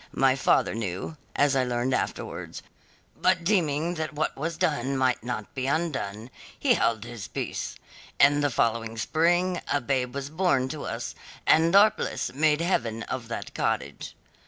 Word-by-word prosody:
My 135 -1 +4
father 135 - +2
knew 105 - -4 0.2
as 145 -1 +3
I 130 - +3
learned 125 +1 -1
afterwards - - -3 0.5
but 185 -2 +2
deeming 170 -4 +1
that 155 -2 -4
what 155 +1 -1
was 160 +3 -3
done 140 -6 0
might 130 -3 +1
not 120 -4 -5
be 130 -1 -2
undone, 130 -8 -2 0.3
he - - +4
held 110 -2 +1
his 115 -3 -7
peace. - - -4 0.4
In 145 +1 +6
the 145 - +2
following 115 -2 0
spring 175 - +1
a 145 - +3
babe 130 -1 -1
was 140 +1 -4
born 155 -7 +1
to 155 0 -5
us, 115 0 -4 0.3
and 165 +3 +4
our 210 +2 +8
bliss - - -3
made 150 +2 +2
heaven 115 -10 0
of 125 -3 -5
that 115 - -6
cottage. - - -2
135 Hz, 160 wpm, -27 LUFS, 120-160 Hz, 0.5 s, our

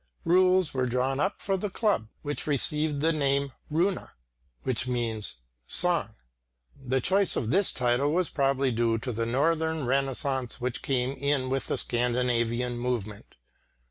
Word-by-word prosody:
Rules 185 0 +3
were 130 -1 0
drawn 130 +2 -1
up 190 +7 -1
for 195 -1 0
the 205 +2 -3
club, 200 - 0 0.2
which 145 0 -4
received 150 +1 +1
the 165 +2 +2
name 140 -2 +1 0.2
"Runa," 175 +5 -1 0.5
i.e. 120 -3 -1 0.5
"song." - - +2 0.6
The 130 0 -1
choice 195 +6 +3
of 110 - -2
this 195 +3 +4
title 125 +3 +1
was 180 +1 +1
probably 135 -1 0
due 115 -1 +1
to 125 +3 -4
the 115 0 -2
Northern 160 +4 0
renaissance 135 -1 -1
which 125 0 -3
came 130 -1 0
in 140 -2 -1
with 135 0 -2
the - - -1
Scandinavian 120 0 0
movement. 115 -4 -4
135 Hz, 140 wpm, -27 LUFS, 125-155 Hz, 0.6 s, this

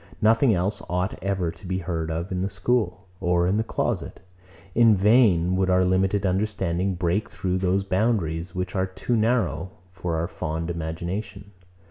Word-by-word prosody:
Nothing 115 +4 +4
else 95 +4 -1
ought 90 +3 -2
ever 95 -4 0
to 85 +3 -13
be 95 0 -1
heard 85 -3 -3
of 85 +3 -3
in 90 -1 -1
the 95 - -1
school, 100 -1 -1
or 90 -1 +2
in 95 +3 +2
the 110 - +1
closet. - - -2 0.5
In 115 0 +6
vain 95 -4 +4
would 95 0 +1
our 90 0 +4
limited 95 +2 +1
understanding 95 -1 0
break 90 +4 0
through 95 0 -2
those 95 +1 +1
boundaries, 90 -5 0
which 90 0 -3
are 95 0 +1
too 95 +6 -2
narrow 110 -5 +1 0.2
for 90 -2 -3
our 80 +1 -1
fond 80 +2 -3
imagination. 90 +5 -5
95 Hz, 165 wpm, -25 LUFS, 85-100 Hz, 0.5 s, In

